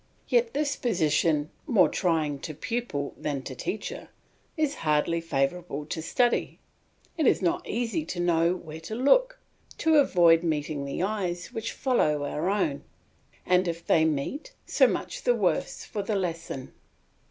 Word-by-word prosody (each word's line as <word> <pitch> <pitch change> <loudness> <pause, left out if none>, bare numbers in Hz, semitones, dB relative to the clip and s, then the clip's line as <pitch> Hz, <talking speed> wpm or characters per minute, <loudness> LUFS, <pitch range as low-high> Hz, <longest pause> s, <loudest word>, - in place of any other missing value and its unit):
Yet 475 -1 +2
this 285 -1 0
position, 160 -7 +1 0.2
more 205 -7 +5
trying 155 -6 0
to 155 +2 -6
pupil 225 - -3
than 140 -3 -3
to 130 - -6
teacher, 205 +10 -5 0.5
is 305 -2 +1
hardly 160 +2 +1
favourable 150 0 -2
to 160 +1 -4
study. 240 +9 +1 0.6
It 305 - +3
is - - +4
not 175 -3 -1
easy 240 +7 -1
to 175 - -5
know 170 0 +2
where 160 -3 -9
to 165 +7 -6
look, - - +3 0.4
to 320 -1 +3
avoid 170 - +5
meeting 150 -3 -2
the 140 +5 -3
eyes 185 -4 -2
which 225 - -3
follow 150 - +1
our 150 +5 -2
own, 185 -9 0 0.6
and 180 0 +3
if 170 0 -4
they 160 - +4
meet 160 - -2
so - - +4
much - - -3
the - - +3
worse - - -1
for 210 - -4
the 205 +1 -2
lesson. 165 -8 -4
175 Hz, 155 wpm, -27 LUFS, 155-230 Hz, 0.6 s, more